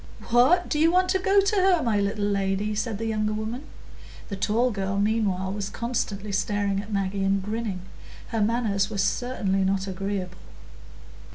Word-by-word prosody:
"What! 260 +10 +5
do 300 - -1
you 325 +2 +5
want 370 +1 +3
to 380 - +2
go 390 +2 +4
to 395 +2 +1
her, 370 -3 +4
my 220 -4 +1
little 200 +1 -1
lady?" 200 +1 0
said 215 0 -2
the 225 - -4
younger 215 -1 0
woman. 220 +6 -4 0.6
The 200 - -3
tall 225 +6 +1
girl 195 -1 -2
meanwhile 200 -3 0
was 200 -1 -3
constantly 220 -4 -3
staring 200 0 0
at 205 +1 -10
Maggie 195 -1 -1
and 195 0 +1
grinning. 210 -2 -3 0.5
Her 225 -2 -1
manners 210 -3 +1
were 215 - -5
certainly 195 -2 0
not 190 0 0
agreeable. 190 -1 -4
210 Hz, 170 wpm, -25 LUFS, 195-235 Hz, 0.6 s, What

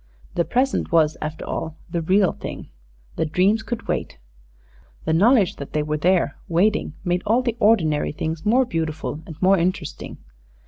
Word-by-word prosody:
The 170 - +1
present 260 +2 0
was 160 -2 +3
after 155 +1 -5
all 160 0 -4
the 170 - -1
real 190 +3 +3
thing. - - -8 0.5
The - - +1
dreams 190 +8 +2
could 230 +1 -5
wait. - - -3 0.9
The 160 - +1
knowledge 205 +2 +4
that 140 - -8
they 150 - +1
were 150 0 -2
there, 180 +3 +2
waiting, 185 +6 +1
made 175 -1 0
all 230 +5 +2
the 235 -3 -1
ordinary 170 -10 +3
things 160 +1 -4
more 250 +5 +3
beautiful 160 -4 -3
and 160 -2 -10
more 190 0 +5
interesting. 175 -2 -3
175 Hz, 165 wpm, -22 LUFS, 160-215 Hz, 0.9 s, more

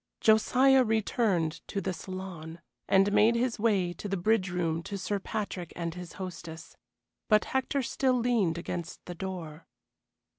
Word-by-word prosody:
Josiah 255 +5 +5
returned 215 -7 0
to 200 - -2
the 190 0 -2
saloon, 175 -2 -7 0.3
and 195 +1 +4
made 225 +3 +5
his 240 -1 0
way 200 -6 +2
to 205 - -7
the 195 - -1
bridge 195 +1 +2
room 170 -2 -1
to 200 +4 -5
Sir 200 +1 -2
Patrick 190 -4 -4
and 170 -1 -3
his 180 -1 -8
hostess; 170 -3 -8 0.5
but 215 -1 +4
Hector 265 +1 -1
still 255 +1 +1
leaned 230 -9 +1
against 170 -1 -5
the 175 - -6
door. 170 -4 -7
190 Hz, 150 wpm, -29 LUFS, 170-220 Hz, 0.5 s, Josiah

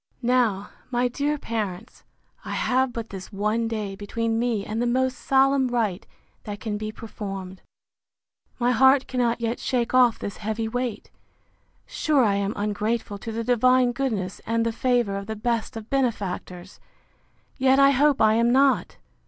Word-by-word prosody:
Now, 235 -5 +1 0.2
my 245 0 +1
dear 285 +4 -1
parents, 220 -4 -5 0.4
I - - -5
have 260 0 +1
but 230 -1 -6
this 190 0 -8
one 215 +3 0
day 210 -3 -4
between 225 +3 -2
me 230 -4 -1
and 220 +2 -3
the 240 - +1
most 260 +1 +1
solemn 270 0 +3
rite 220 -6 -1 0.4
that 205 -1 -6
can 210 +1 -3
be 215 +1 -4
performed. 195 -4 -7 1.0
My 245 0 +2
heart 265 +3 +5
cannot 240 -2 -1
yet 230 +1 -2
shake 245 -2 -1
off 250 -3 +5
this 200 - -6
heavy 220 +1 -3
weight. 245 -2 -4 0.7
Sure 295 -4 +1
I 205 -3 +3
am 200 +1 -1
ungrateful 210 0 -2
to 225 - -6
the 230 +1 -3
divine 250 +1 +3
goodness, 225 -8 -3
and 230 +1 +1
the 230 - +1
favour 240 -4 +1
of 200 0 -6
the 220 - -4
best 225 +1 -2
of 220 0 -10
benefactors!—Yet 225 +2 -3
I 275 0 +6
hope 285 +1 +3
I 215 0 +5
am 235 +2 +3
not! 270 +1 +2
230 Hz, 160 wpm, -24 LUFS, 210-250 Hz, 1.0 s, I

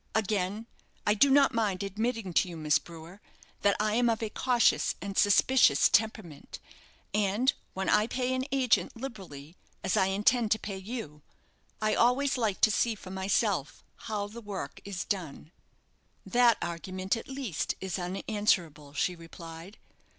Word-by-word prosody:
Again, 210 0 -1 0.4
I 210 - +4
do 275 +7 +4
not 275 0 +5
mind 205 -5 0
admitting 215 0 -3
to 180 - +2
you, 170 - -7
Miss 155 -1 +2
Brewer, 170 +4 -12 0.4
that 200 -1 +3
I 215 0 +1
am 240 +1 +3
of 225 0 -1
a 215 - -3
cautious 245 -1 +2
and 200 -1 -6
suspicious 230 +6 +5
temperament; 210 -8 -1 0.6
and 210 +6 +2 0.2
when 190 0 -2
I 210 +1 +3
pay 255 +1 -1
an 260 0 -1
agent 265 -3 +2
liberally, 185 - -9 0.3
as - - 0
I 190 - +3
intend 215 +4 +2
to - - -3
pay 200 -2 -5
you, 190 -8 -7 0.6
I 215 0 +2
always 260 +4 +2
like 220 -6 -1
to 215 - +5
see 230 +1 +1
for 190 -2 -11
myself 190 - -1
how 210 -2 -4
the 220 +3 -9
work 205 -3 -6
is 195 -3 -5
done." 170 -5 -4 0.7
"That 240 -3 +4
argument, 185 +3 -3
at 225 - -7
least, 265 - -3
is 190 0 -4
unanswerable," 180 -6 -1
she 180 +4 0
replied. 165 +2 -11
205 Hz, 155 wpm, -29 LUFS, 185-230 Hz, 0.7 s, not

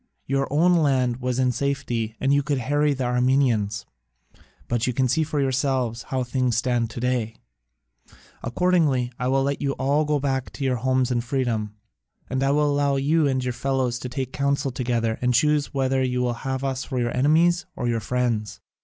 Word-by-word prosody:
Your 135 0 -1
own 175 +4 +4
land 130 -6 +2
was 125 -1 -2
in 130 -1 +2
safety 120 -4 -2
and 135 +1 +2
you 145 - +3
could 145 0 -1
harry 145 +3 +1
the 130 - -3
Armenians: 125 -4 +1 0.8
but 120 0 0
you 125 - 0
can 130 +1 +1
see 130 +6 +1
for 150 -1 -2
yourselves 130 -3 0
how 130 -1 0
things 125 -1 0
stand 120 -2 0
to 115 - -7
day. 120 -3 -1 1.1
Accordingly 140 -3 +1
I 125 - -1
will 135 +1 +2
let 140 +1 -1
you 140 -1 0
all 140 +3 +1
go 150 -1 +1
back 135 -2 -1
to 140 - -6
your 130 -1 +1
homes 130 +1 +1
in 120 -1 +1
freedom, 115 -4 -2 0.6
and 130 0 -1
I 135 - +2
will 150 +1 +3
allow 140 -1 +1
you 150 +3 +2
and 130 -2 0
your 125 -1 -2
fellows 125 -1 -1
to 125 - -6
take 130 0 -4
counsel 140 0 0
together 120 -3 -1
and 125 0 +2
choose 150 +3 +2
whether 135 -1 0
you 125 -1 0
will 120 -1 0
have 130 +2 -4
us 135 -1 -2
for 130 - -5
your 120 -1 -1
enemies 165 +7 +3
or 120 - -2
your 115 -1 0
friends. 110 -3 -2
130 Hz, 195 wpm, -24 LUFS, 120-140 Hz, 1.1 s, own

